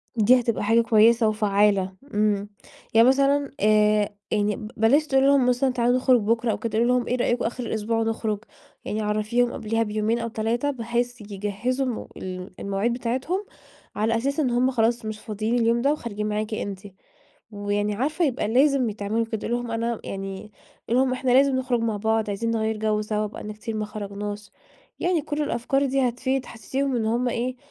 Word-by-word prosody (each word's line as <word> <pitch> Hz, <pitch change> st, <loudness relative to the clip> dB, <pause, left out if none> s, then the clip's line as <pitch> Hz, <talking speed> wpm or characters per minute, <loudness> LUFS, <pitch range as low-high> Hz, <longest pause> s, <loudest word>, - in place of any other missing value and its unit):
دي 240 Hz, +3 st, +5 dB
هتبقى 230 Hz, -3 st, -1 dB
حاجة 225 Hz, +3 st, +4 dB
كويسة 230 Hz, 0 st, +4 dB
وفعّالة. 205 Hz, -3 st, +2 dB, 0.2 s
إمم، 205 Hz, -1 st, +1 dB, 0.4 s
يعني 230 Hz, +2 st, +6 dB
مثلًا، 275 Hz, +1 st, +3 dB
آآ، 210 Hz, 0 st, +3 dB, 0.2 s
يعني 210 Hz, -1 st, +1 dB, 0.2 s
بلاش 275 Hz, +8 st, +3 dB
تقولي 270 Hz, -1 st, +3 dB
لهم 280 Hz, -2 st, +4 dB
مثلًا: 255 Hz, +2 st, +2 dB
"تعالوا 245 Hz, 0 st, +2 dB
نخرج 255 Hz, -2 st, +4 dB
بُكرة 230 Hz, +2 st, +1 dB
أو -, -, -2 dB
كده." 220 Hz, -2 st, -3 dB
قولي 235 Hz, -, +3 dB
لهم: 250 Hz, -1 st, +2 dB
"إيه 250 Hz, -, +1 dB
رأيكم 240 Hz, -1 st, 0 dB
آخر 245 Hz, +2 st, -3 dB
الأسبوع 225 Hz, +1 st, -1 dB
نخرج؟" 220 Hz, -2 st, -2 dB, 0.5 s
يعني 215 Hz, -, -2 dB
عرّفيهم 215 Hz, +3 st, 0 dB
قبليها 225 Hz, 0 st, -1 dB
بيومين 215 Hz, +2 st, -1 dB
أو 230 Hz, -, -3 dB
3، 230 Hz, +5 st, -1 dB
بحيث 240 Hz, -1 st, -2 dB
يجهّزوا 210 Hz, +6 st, -2 dB
م 245 Hz, -3 st, -4 dB
ال 185 Hz, 0 st, -6 dB
المواعيد 200 Hz, +4 st, -1 dB
بتاعتهم 260 Hz, -, -2 dB, 0.5 s
على 225 Hz, +2 st, +1 dB
أساس 275 Hz, +6 st, -1 dB
إن 275 Hz, -5 st, +2 dB
هم 250 Hz, +2 st, +2 dB
خلاص 230 Hz, -1 st, +1 dB
مش 215 Hz, -1 st, -5 dB
فاضيين 215 Hz, +2 st, -2 dB
اليوم 235 Hz, +1 st, +2 dB
ده 280 Hz, -, +3 dB
وخارجين 215 Hz, -8 st, -3 dB
معاكِ 215 Hz, +1 st, -2 dB
أنتِ. 200 Hz, -3 st, -4 dB, 0.7 s
ويعني 205 Hz, 0 st, -1 dB
عارفة 305 Hz, -, 0 dB
يبقى 255 Hz, -6 st, 0 dB
لازم 260 Hz, 0 st, +3 dB
ي -, -, -7 dB
تعملوا 215 Hz, +2 st, -1 dB
كده. 220 Hz, -1 st, -4 dB
قولي 235 Hz, -, 0 dB
لهم 240 Hz, -1 st, -6 dB
أنا 230 Hz, 0 st, -2 dB
يعني، 195 Hz, +2 st, -6 dB, 0.4 s
قولي 240 Hz, +3 st, +3 dB
لهم: 260 Hz, -1 st, +2 dB
"إحنا 255 Hz, 0 st, -1 dB
لازم 270 Hz, +1 st, +5 dB
نخرج 255 Hz, -2 st, 0 dB
مع 225 Hz, -2 st, -1 dB
بعض، 220 Hz, 0 st, 0 dB
عايزين 230 Hz, +3 st, -2 dB
نغيّر 220 Hz, -1 st, 0 dB
جَوّ 215 Hz, 0 st, 0 dB
سوا، 215 Hz, 0 st, -1 dB
بقالنا 210 Hz, 0 st, -7 dB
كتير 220 Hz, +1 st, -6 dB
ما 215 Hz, -, -1 dB
خرجناش." 205 Hz, 0 st, -6 dB, 0.5 s
يعني 350 Hz, -3 st, +1 dB
كل 300 Hz, 0 st, -2 dB
الأفكار 270 Hz, +1 st, 0 dB
دي 265 Hz, -1 st, +2 dB
هتفيد. 260 Hz, +2 st, -2 dB
حسّسيهم 260 Hz, +4 st, -2 dB
إنّ 230 Hz, -, 0 dB
هم 240 Hz, +3 st, +1 dB
إيه 245 Hz, +2 st, -2 dB
230 Hz, 185 wpm, -24 LUFS, 210-250 Hz, 0.7 s, يعني